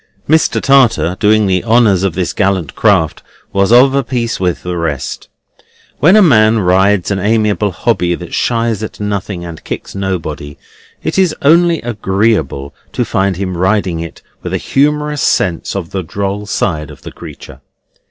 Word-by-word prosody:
Mr. 160 +1 +2
Tartar 120 -10 +3
doing 110 0 +3
the 95 -2 0
honours 110 -5 +3
of 95 -4 -1
this 90 -2 -2
gallant 95 -6 -1
craft 80 -2 +1 0.3
was 100 +1 +2
of 130 +3 +6
a 140 0 +1
piece 120 -2 -3
with 90 -2 -1
the 90 0 -4
rest. 80 -5 -4 0.7
When 175 +7 +5
a 215 - +6
man 110 -8 +4
rides 95 0 +2
an 100 - 0
amiable 105 0 +1
hobby 90 -2 0
that 85 0 -10
shies 115 -2 0
at 110 - -7
nothing 100 -3 -4
and 85 -2 -9
kicks - - -6
nobody, 80 -7 -4 0.5
it - - -1
is 185 -4 +2
only 170 +2 +3
agreeable 100 - -1 0.2
to - - -1
find 95 -1 0
him 95 -1 -3
riding 95 -1 0
it 85 0 -8 0.2
with - - -4
a - - -5
humorous 150 +1 +1
sense 85 +1 0
of 90 -4 -5
the 95 - -2
droll 100 +4 -4
side 80 -7 -2
of - - -14
the - - -8
creature. - - -12
100 Hz, 165 wpm, -14 LUFS, 90-115 Hz, 0.7 s, of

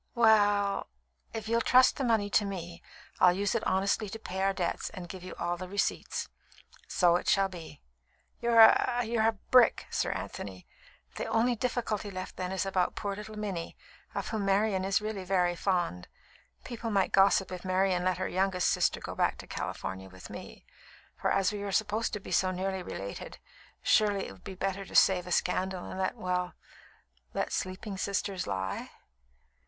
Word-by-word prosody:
"We 235 - 0
ll, 205 -2 +4 0.4
if 220 -1 -5
you'd 230 0 +2
trust 255 0 +6
the 275 - -1
money 225 -4 +2
to 210 - +4
me, 175 -4 -6 0.4
I'd 180 -1 +6
use 200 0 0
it 230 - 0
honestly 195 +2 +1
to 225 - -6
pay 190 -3 -5
our 195 0 +3
debts, 180 -3 -2
and 180 -2 -8
give 185 0 -9
you 185 - -8
all 175 0 -2
the 185 +1 -6
receipts." 200 +1 -1 0.6
"So 175 -1 +4
it - - -3
shall 195 -1 +3
be." 170 - -10 0.6
"You're 235 -1 +6
a 230 +2 +6
a 225 -1 +1
brick, 250 -2 +5
Sir - - 0
Anthony. 95 -2 -7 0.5
The - - -3
only 235 +2 +2
difficulty 225 -3 -2
left 185 -1 -6
then 185 0 -3
is 190 +1 -1
about 185 -2 0
poor 200 -2 -3
little 210 +1 -8
Minnie, 195 -6 -4 0.4
of - - -3
whom 220 -3 -2
Marian 195 0 +2
is 195 +2 +2
really 210 -2 -4
very 180 -2 +1
fond. 175 - -1 0.6
People 235 -2 -5
might 195 -3 +1
gossip 195 -1 +4
if 180 -1 -6
Marian 185 -1 +1
let 185 0 +1
her 185 - -2
youngest 185 -1 +1
sister - - +1
go - - -6
back - - +1
to - - -9
California 95 0 -5
with 95 0 -12
me; - - -10 0.5
for - - -1
as 195 0 +2
we 205 - -4
are 200 -1 -3
supposed 215 +3 0
to 210 - -2
be - - -10
so 185 - +3
nearly 190 +1 -2
related, 100 - -7 0.5
surely 205 -2 +3
it - - -9
would 95 - -15
be 190 - -7
better 195 +1 -2
to - - -11
save 180 -2 +5
a - - -6
scandal 185 +1 0
and 185 - -6
let 185 - 0
well, 180 -1 -2 0.8
let - - -1
sleeping 190 +2 -4
sisters 200 -1 -2
lie?" 95 -1 -3
195 Hz, 185 wpm, -30 LUFS, 180-210 Hz, 0.8 s, trust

